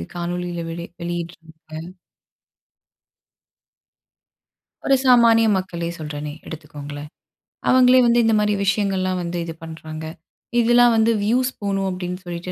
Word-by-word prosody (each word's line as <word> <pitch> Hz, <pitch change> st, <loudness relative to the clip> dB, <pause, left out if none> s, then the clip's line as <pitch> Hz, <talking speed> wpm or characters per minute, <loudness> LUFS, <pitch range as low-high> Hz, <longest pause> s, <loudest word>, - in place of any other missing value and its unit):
காணொளியில 175 Hz, 0 st, -3 dB
வெளி 170 Hz, +1 st, -6 dB, 0.2 s
வெளியிடுறாங்க. 170 Hz, -1 st, -7 dB, 2.9 s
ஒரு 275 Hz, -, +5 dB
சாமானிய 230 Hz, -2 st, +6 dB
மக்களே 170 Hz, -2 st, -3 dB
சொல்றேனே, 150 Hz, -1 st, -5 dB, 0.2 s
எடுத்துக்கோங்களேன், 145 Hz, -1 st, -8 dB, 0.6 s
அவங்களே 255 Hz, 0 st, +6 dB
வந்து 240 Hz, 0 st, +4 dB
இந்த 225 Hz, -, +3 dB
மாரி 210 Hz, 0 st, +1 dB
விஷயங்கள்லாம் 190 Hz, -2 st, 0 dB
வந்து, 175 Hz, +1 st, -4 dB
இது 165 Hz, -, -6 dB
பண்றாங்க. 160 Hz, -1 st, -8 dB, 0.5 s
இதெல்லாம் 240 Hz, 0 st, +5 dB
வந்து 225 Hz, +1 st, +3 dB
வியூஸ் 250 Hz, +4 st, +1 dB
போணும் 195 Hz, -1 st, -1 dB
அப்படின்னு 180 Hz, -1 st, -4 dB
சொல்லிட்டு, 175 Hz, +1 st, -6 dB
180 Hz, 105 wpm, -21 LUFS, 165-220 Hz, 2.9 s, சாமானிய